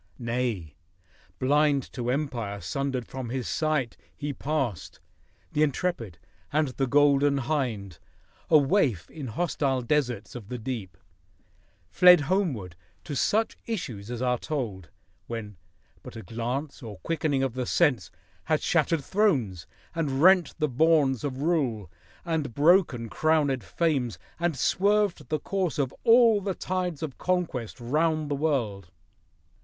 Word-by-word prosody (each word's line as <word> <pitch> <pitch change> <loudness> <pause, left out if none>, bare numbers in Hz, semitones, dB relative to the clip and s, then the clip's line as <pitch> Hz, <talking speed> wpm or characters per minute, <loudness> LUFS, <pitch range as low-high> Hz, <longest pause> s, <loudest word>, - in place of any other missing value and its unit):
— - - -36
Nay, 115 - -2 0.6
blind 145 0 +2
to 120 -1 -3
empire 125 -7 -2
sundered 130 +7 -2
from 130 -3 -6
his 130 0 -3
sight, 155 -7 -1 0.2
He 145 -1 -3
passed, 135 - -3 0.5
the 150 - 0
intrepid, 140 - -1 0.3
and 150 -1 +1
the 135 +1 -2
Golden 145 0 +4
Hind, 120 - -2 0.5
A 160 - +7
waif 140 - +1
in 150 -5 -7
hostile 135 -1 -1
deserts 120 -5 -1
of 110 -4 -9
the 125 - -4
deep, 110 -7 -5 0.9
Fled 180 - +7
homeward, 140 - -1 0.3
to 145 - -5
such 220 - +1
issues 120 - -4
as 120 0 -4
are 125 -1 +1
told, 110 - -4 0.4
When 105 -4 -6 0.4
but - - -11
a 115 - -7
glance, 125 +6 -4
or 110 -5 -8
quickening 150 -4 0
of 135 -3 -1
the 125 -1 -3
sense, 145 -9 +2 0.4
Had - - +1
shattered 160 -4 +1
thrones, 135 - +1 0.3
and 150 -4 -1
rent 185 -1 +5
the 155 -2 +1
bourns 140 -2 +3
of 140 -1 -3
rule, 125 - 0 0.3
And 155 -8 -2
broken 150 -7 +3
crowned 145 -3 +1
fames, 130 - -1 0.2
and 170 -4 0
{swerved 205 +3 +1
the 155 -1 0
m^rse 185 0 -1
I - - -8
4 145 - +3
Of 130 - -6
all 230 -3 +6
the 195 -1 -2
tides 180 -4 -3
of 145 -5 -6
conquest 165 -12 -2
round 155 +4 0
the - - +1
world. 120 - -1
140 Hz, 140 wpm, -27 LUFS, 120-160 Hz, 0.9 s, A